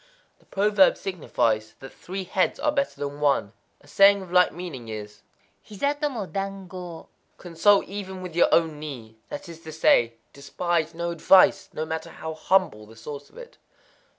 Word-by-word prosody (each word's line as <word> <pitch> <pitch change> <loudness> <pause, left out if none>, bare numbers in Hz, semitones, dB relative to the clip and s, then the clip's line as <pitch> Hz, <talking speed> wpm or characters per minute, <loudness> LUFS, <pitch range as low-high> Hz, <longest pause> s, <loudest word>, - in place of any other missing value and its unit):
—The - - -29
proverb 200 -1 +3
signifies 115 - -1
that 135 - -11
three 190 +2 -6
heads 185 0 0
are 300 - +1
better 280 -1 -2
than 145 0 -4
one. 140 -8 +1 0.3
A 145 - -21
saying 195 +5 +5
of 180 - -13
like 180 0 +5
meaning 155 -9 -8
is,_ 105 -1 -8 0.4
Hiza 280 +8 -1
to 295 - +1
mo 230 -7 -4
dankō:_ 190 -3 -6 0.3
"Consult 185 +4 +3
even 190 -2 -7
with 175 -3 -8
your 175 - +4
own 160 -3 +2
knee;" 120 -7 -9
that - - -7
is 165 -1 -10
to 160 -1 -9
say, 120 -7 +3 0.2
Despise 165 +3 -2
no 170 0 -3
advice, 190 +4 +4
no 155 - -4
matter 160 0 -5
how 160 0 -7
humble 155 - +1
the 110 - -15
source 140 +6 -9
of - - -20
it. - - -12
170 Hz, 175 wpm, -25 LUFS, 145-195 Hz, 0.4 s, saying